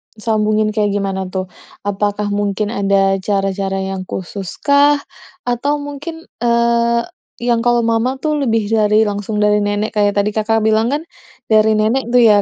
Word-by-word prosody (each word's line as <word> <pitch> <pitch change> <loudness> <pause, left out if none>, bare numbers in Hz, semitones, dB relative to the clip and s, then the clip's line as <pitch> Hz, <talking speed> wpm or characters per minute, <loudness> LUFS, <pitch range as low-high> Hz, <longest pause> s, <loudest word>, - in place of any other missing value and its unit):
Disambungin 215 -1 0
kayak 210 -2 0
gimana 195 -2 -2
tuh? 185 0 -4 0.3
Apakah 205 0 -1
mungkin 205 +1 -1
ada 195 -2 +2
cara-cara 195 0 -1
yang 190 -1 -5
khususkah? 280 - +1 0.4
Atau 280 +5 -1
mungkin, 295 +3 -7 0.2
eee, 235 0 +2 0.3
yang 235 -1 0
kalau 240 -1 +2
mama 230 +3 0
tuh 305 +1 -1
lebih 225 -3 +1
dari 215 0 +3
langsung 205 +1 -3
dari 210 0 +3
nenek, 205 +2 -1
kayak 205 -1 +1
tadi 205 +1 +1
Kakak 220 0 +1
bilang 220 +2 +2
kan 290 +2 -1 0.5
dari 220 0 +5
nenek 230 +3 +1
tuh 245 0 +4
ya, 210 -2 +6
215 Hz, 150 wpm, -17 LUFS, 205-235 Hz, 0.5 s, ya